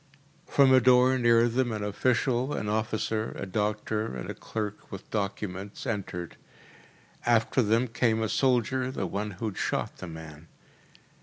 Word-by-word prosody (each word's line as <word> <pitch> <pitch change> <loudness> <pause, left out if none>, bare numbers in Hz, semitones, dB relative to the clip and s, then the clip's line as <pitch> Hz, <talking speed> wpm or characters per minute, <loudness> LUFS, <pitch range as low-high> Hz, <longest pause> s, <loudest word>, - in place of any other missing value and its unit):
From 135 -2 +5
a 130 - +8
door 130 +1 +5
near 120 -1 +5
them 120 +1 0
an 105 -2 -3
official, 125 +5 +1
an 105 - -3
officer, 110 +1 -1
a - - -4
doctor, 105 -2 -2
and 60 - -5
a - - -5
clerk 105 -2 -6
with 95 -1 -8
documents, 100 -1 -4
entered. 90 -5 -4 0.9
After 120 +2 +3
them 115 +3 +2
came 115 -1 +1
a - - 0
soldier, 130 +1 +1
the 130 -7 -3
one 105 +3 -3
who 115 - -4
had 105 -3 -4
shot - - -2
the - - -7
man. 80 -1 -10
110 Hz, 155 wpm, -28 LUFS, 100-120 Hz, 0.9 s, a